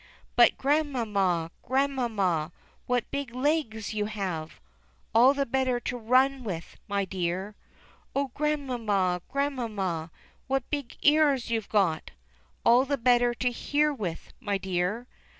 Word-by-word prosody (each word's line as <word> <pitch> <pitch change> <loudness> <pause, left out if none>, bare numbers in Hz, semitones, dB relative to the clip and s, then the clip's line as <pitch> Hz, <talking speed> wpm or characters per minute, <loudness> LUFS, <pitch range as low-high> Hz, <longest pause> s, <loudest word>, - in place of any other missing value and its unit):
"But 240 - +6
Grandmamma, 220 - +1
Grandmamma, 230 - 0 0.4
what 250 -1 0
big 280 -4 -4
legs 255 -6 0
you 210 -1 -1
have 185 -7 -4 0.3
!" - - -37
"All 250 +5 +6
the 280 0 +1
better 260 -1 0
to 245 - -3
run 255 +3 +2
with, 175 -7 -5
my 200 -1 0
dear." 190 +2 -3 0.6
"Oh, 275 -2 0
Grandmamma, 235 -12 0
Grandmamma, 215 - -2 0.4
what 270 0 0
big 285 -5 -4
ears 290 -5 +4
youVe 225 -3 -1
got!" 185 -7 +1 0.6
"All 240 +2 +6
the 280 +1 -1
better 245 -1 +3
to 250 0 0
hear 295 +5 +1
with, 185 -11 -5
my 200 -1 -1
dear." 190 +5 -2
235 Hz, 130 wpm, -28 LUFS, 195-270 Hz, 0.6 s, But